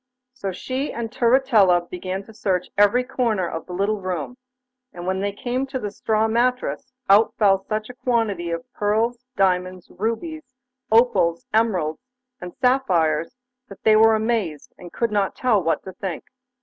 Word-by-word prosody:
So 200 -6 -4
she 260 +9 -3
and 230 -1 -5
Turritella 230 -8 +3
began 185 +2 -5
to 220 - -15
search 185 -4 -1
every 205 +5 +4
corner 230 -8 -1
of 165 -1 -6
the 180 - -7
little 200 +3 -1
room, 185 +4 -4 0.6
and 175 0 -8
when 190 +1 -1
they 200 +1 -1
came 250 +6 -3
to 265 0 -4
the 210 -4 -4
straw 220 +1 0
mattress 250 +3 0 0.2
out 205 +3 +5
fell 195 -3 +4
such 215 0 -3
a 250 - -9
quantity 225 -9 -1
of 165 0 -4
pearls, 230 +4 0
diamonds, 185 -1 0
rubies, 255 - -4 0.4
opals, 190 -8 +3
emeralds, 185 -9 +1 0.4
and 180 -1 -8
sapphires, 175 - +1 0.3
that 195 - -13
they 215 - +5
were 220 0 +6
amazed, 215 -9 -2
and 175 -1 -12
could 235 -2 -1
not 200 -2 0
tell 235 -6 +2
what 165 -1 0
to 190 - -8
think. 185 -3 -5
210 Hz, 160 wpm, -22 LUFS, 185-235 Hz, 0.6 s, were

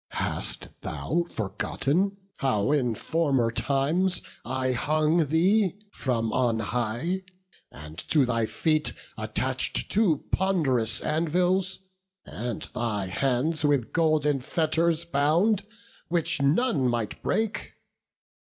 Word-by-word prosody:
Hast - - -3
thou 115 - -1
forgotten 155 - -1 0.2
how 130 -2 +1
in 125 -6 +2
former 135 -5 +1
times 145 +10 0 0.2
I 130 0 -1
hung 155 +5 +2
thee 185 +5 +3
from 115 - -1
on 120 -3 +2
high, 120 - -1 0.5
and 75 +4 -10
to 145 -4 +4
thy 115 -2 0
feet 155 +3 0 0.2
Attach'd - - -2
two 195 -8 +2
pond'rous 140 - +1
anvils, 180 +4 +1 0.4
and 120 -1 -4
thy 110 -5 -1
hands 135 - 0
With 145 -5 +2
golden 155 -3 +2
fetters 165 +4 +1
bound, 170 +8 +2 0.4
which 165 -3 0
none 145 - +3
might 115 -3 -2
break? 220 -1 -1
150 Hz, 105 wpm, -27 LUFS, 120-170 Hz, 0.5 s, to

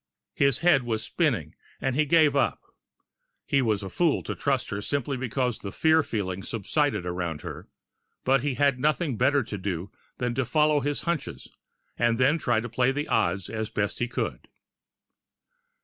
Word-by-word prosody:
His 140 -1 +2
head 170 -6 +5
was 115 -2 -2
spinning, 115 - 0 0.3
and 135 -1 -1
he 150 +2 +3
gave 155 -1 +4
it - - 0
up. - - 0 0.8
He 140 - +2
was 110 -4 0
a 95 - -5
fool 165 - +1
to - - -3
trust 135 -3 -1
her 100 0 -3
simply 140 +3 -2
because 125 -1 -1
the 100 - -6
fear 160 +6 +4
feeling 95 -8 -3
subsided 115 - -1
around 90 -3 -3
her - - -7 0.6
but 135 0 +3
he 140 -1 -1
had 140 -2 +2
nothing 150 0 +1
better 140 +4 +3
to 105 -3 -6
do 95 0 -4 0.3
than 125 -1 -1
to 130 - 0
follow 150 +3 +3
his 145 +1 -2
hunches, 170 -4 -3 0.5
and 120 -1 +2
then 140 +6 +3
try 120 -6 +1
to 120 - -5
play 125 +3 +1
the 145 +3 -3
odds 95 -4 +1
as 110 -1 -4
best 105 -2 -2
he 120 - 0
could. - - -4
125 Hz, 180 wpm, -26 LUFS, 105-145 Hz, 0.8 s, head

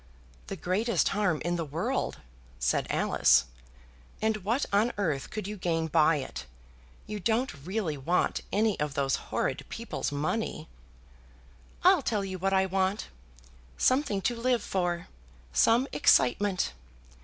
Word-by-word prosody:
"The 195 - -4
greatest 190 +3 +1
harm 195 -6 0
in 175 0 0
the 165 - -1
world!" 155 +2 -2 0.4
said - - 0
Alice; - - +3 0.7
"and 220 0 +1
what 225 +8 0
on 215 +4 +3
earth 155 -9 -1
could 215 -3 -5
you 210 0 -5
gain 165 -3 0
by 155 0 +4
it? 65 - -6 0.6
You 210 0 -5
don't 230 +6 0
really 185 -4 -2
want 170 +7 0
any 215 -1 +1
of 150 -1 -2
those 135 -1 +1
horrid - - -1
people's - - -4
money?" 155 +3 -2 1.2
"I'll - - +6
tell 205 -3 -1
you 190 -1 -5
what 195 +2 0
I 190 0 +3
want, 190 +2 -1 0.7
something 255 -7 +2
to 240 - +1
live 240 -1 +1
for, 175 -2 -1 0.5
some 235 - +4
excitement. 195 - +3
190 Hz, 135 wpm, -29 LUFS, 160-215 Hz, 1.2 s, I'll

